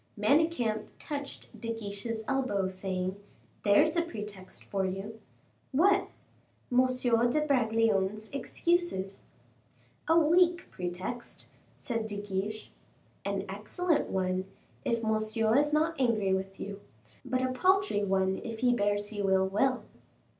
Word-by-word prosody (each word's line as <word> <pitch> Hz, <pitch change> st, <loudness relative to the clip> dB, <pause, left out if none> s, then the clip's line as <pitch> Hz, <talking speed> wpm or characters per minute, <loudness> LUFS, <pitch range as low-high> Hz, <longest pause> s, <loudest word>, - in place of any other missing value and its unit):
Manicamp 280 Hz, -9 st, +2 dB
touched 285 Hz, -2 st, -5 dB
De 230 Hz, -1 st, -3 dB
Guiche's 220 Hz, +1 st, -4 dB
elbow, 255 Hz, -8 st, 0 dB
saying, 185 Hz, 0 st, -3 dB, 0.5 s
"There's 295 Hz, +11 st, +5 dB
a 340 Hz, -, +3 dB
pretext 210 Hz, -, -7 dB
for 195 Hz, -1 st, -2 dB
you." 195 Hz, +4 st, -4 dB, 0.5 s
"What?" 385 Hz, +8 st, +4 dB, 0.6 s
"M. 255 Hz, +1 st, +5 dB, 0.4 s
de 300 Hz, +4 st, +1 dB
Bragelonne's 220 Hz, -6 st, +1 dB
excuses." 280 Hz, -, -1 dB, 0.9 s
"A 325 Hz, -, +5 dB
weak 345 Hz, +2 st, +4 dB
pretext," 185 Hz, +7 st, -5 dB, 0.3 s
said 230 Hz, -3 st, -3 dB
De 205 Hz, -1 st, -3 dB
Guiche. 205 Hz, +2 st, -4 dB, 0.5 s
"An -, -, -2 dB
excellent 355 Hz, -4 st, -1 dB
one, 185 Hz, 0 st, 0 dB, 0.4 s
if 230 Hz, -1 st, 0 dB
Monsieur 220 Hz, +1 st, +1 dB
is 295 Hz, +2 st, +3 dB
not 310 Hz, -1 st, +1 dB
angry 215 Hz, -6 st, +2 dB
with 190 Hz, 0 st, -3 dB
you; 200 Hz, 0 st, -6 dB, 0.4 s
but 255 Hz, 0 st, -1 dB
a 255 Hz, -, +1 dB
paltry 370 Hz, -, +2 dB
one 190 Hz, -1 st, +1 dB
if 225 Hz, -1 st, -6 dB
he 250 Hz, -1 st, +4 dB
bears 205 Hz, -1 st, 0 dB
you 205 Hz, -2 st, -1 dB
ill 190 Hz, 0 st, +4 dB
will." 255 Hz, +7 st, +1 dB
220 Hz, 125 wpm, -30 LUFS, 195-275 Hz, 0.9 s, There's